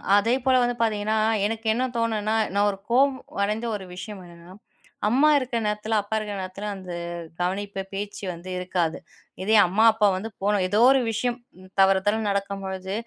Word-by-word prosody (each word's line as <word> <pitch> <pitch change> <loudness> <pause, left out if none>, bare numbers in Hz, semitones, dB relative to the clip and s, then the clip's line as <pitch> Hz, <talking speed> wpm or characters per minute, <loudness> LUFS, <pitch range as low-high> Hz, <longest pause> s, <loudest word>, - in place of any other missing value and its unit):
அதேபோல 250 +5 +2
வந்து 245 0 0
பார்த்தீங்கன்னா, 215 -1 +1 0.3
எனக்கு 225 +1 -3
என்ன 250 +3 0
தோணுனா, 220 -1 0 0.2
நான் 205 +1 +3
ஒரு 195 - -8
கோவம் 265 +2 +3 0.3
அடைந்த 215 +3 -1
ஒரு 190 -2 -6
விஷயம் 205 +1 -7
என்னன்னா, 170 +1 -14 0.6
அம்மா 280 +6 +4
இருக்க 255 -3 -3
நேரத்துல, 210 +1 -1
அப்பா 205 +2 -4
இருக்க 210 -1 -5
நேரத்துல 185 +3 -6
அந்த 185 -2 -9 0.5
கவனிப்பு 195 +2 -2
பேச்சு 205 +1 -5
வந்து 175 +2 -10
இருக்காது. 180 -3 -1 0.5
இதே 220 +3 +3
அம்மா, 210 +5 +2
அப்பா 210 -2 +3
வந்து 220 +4 -5
போணும் 200 -2 +2
எதோ 205 +3 +1
ஒரு 270 -1 +4
விஷயம் 240 +2 -1 0.4
தவறுதால 195 +3 +3
நடக்கும் 200 0 -2
பொழுது, 190 0 -5
205 Hz, 160 wpm, -25 LUFS, 195-225 Hz, 0.6 s, அம்மா